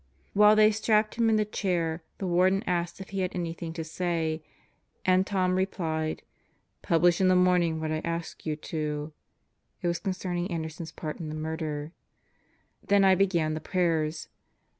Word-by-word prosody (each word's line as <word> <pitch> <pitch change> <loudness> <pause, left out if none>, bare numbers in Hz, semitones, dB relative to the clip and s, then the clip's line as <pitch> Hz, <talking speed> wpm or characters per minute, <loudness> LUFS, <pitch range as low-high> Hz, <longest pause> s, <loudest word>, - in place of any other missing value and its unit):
While 210 +1 +6
they 215 0 +6
strapped 215 0 +2
him 230 -1 +2
in 220 - +4
the 215 0 +2
chair, 175 -5 -1 0.2
the 195 - -4
Warden 185 +2 +3
asked 175 0 -1
him - - -5
if - - -18
he 195 - -3
had 185 -1 -2
anything 170 -1 -4
to 165 -1 -4
say, 160 -1 -2 0.6
and 185 +1 +3
Tom 185 -2 +1
replied: 160 -4 -1 0.6
"Publish 170 +2 +3
in 185 - +4
the 185 - +5
morning 180 -3 +3
what 155 0 -2
I 155 - 0
asked 170 0 -4
you 155 -1 -2
to." 150 -1 -4 0.7
(It - - +1
was 170 0 0
concerning 185 -2 -3
Anderson's 160 -1 -5
part 155 -1 -6
in 160 -3 -5
the 155 - -5
murder.) 155 -1 -4 0.9
Then 200 -1 +4
I 190 - +7
began 175 -5 +2
the 155 - -4
prayers. 165 -3 0
175 Hz, 170 wpm, -28 LUFS, 160-190 Hz, 0.9 s, I